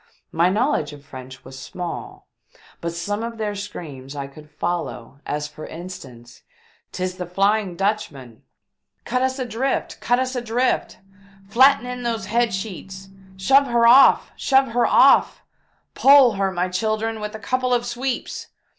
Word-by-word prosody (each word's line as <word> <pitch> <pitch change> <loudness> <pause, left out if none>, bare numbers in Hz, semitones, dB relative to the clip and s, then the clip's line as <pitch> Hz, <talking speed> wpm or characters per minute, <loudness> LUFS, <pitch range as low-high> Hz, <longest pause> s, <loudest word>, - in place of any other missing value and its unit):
My 170 +2 +2
knowledge 205 - 0
of 145 -1 -14
French 130 -1 -11
was 130 0 -10
small, 385 - -7 0.5
but 170 - -3
some 200 +6 -3
of 230 0 -5
their 210 -2 -2
screams 155 -10 -8
I 140 -1 -4
could 150 +2 -14
follow, 145 -6 -4
as 150 0 -3
for 150 +1 -10
instance: 140 -9 -10 0.3
" - - -37
'Tis 185 0 -4
the 180 -2 -5
Flying 195 +1 +1
Dutchman 150 - -3 0.2
!" - - -59
" - - -51
Cut 250 +1 -1
us 260 0 0
adrift! 255 +1 -2
Cut 245 - +2
us 260 +1 -2
adrift 245 +1 -1 0.2
!" 195 0 -25
"Flatten 265 +1 +5
in 250 0 -5
those 230 -4 -2
head 235 +3 +1
sheets! 190 -1 -7 0.3
Shove 270 +9 +4
her 235 -1 +2
off! 255 +4 +6
Shove 265 -1 +2
her 240 +1 +1
off! - - +4 0.5
Pole 275 -3 +6
her, 195 -2 -1
my 180 0 -1
children, 215 +4 -2
with 210 +1 -6
a - - -4
couple 255 +4 -1
of 240 -1 +1
sweeps 245 +1 -4
205 Hz, 165 wpm, -22 LUFS, 170-240 Hz, 0.5 s, off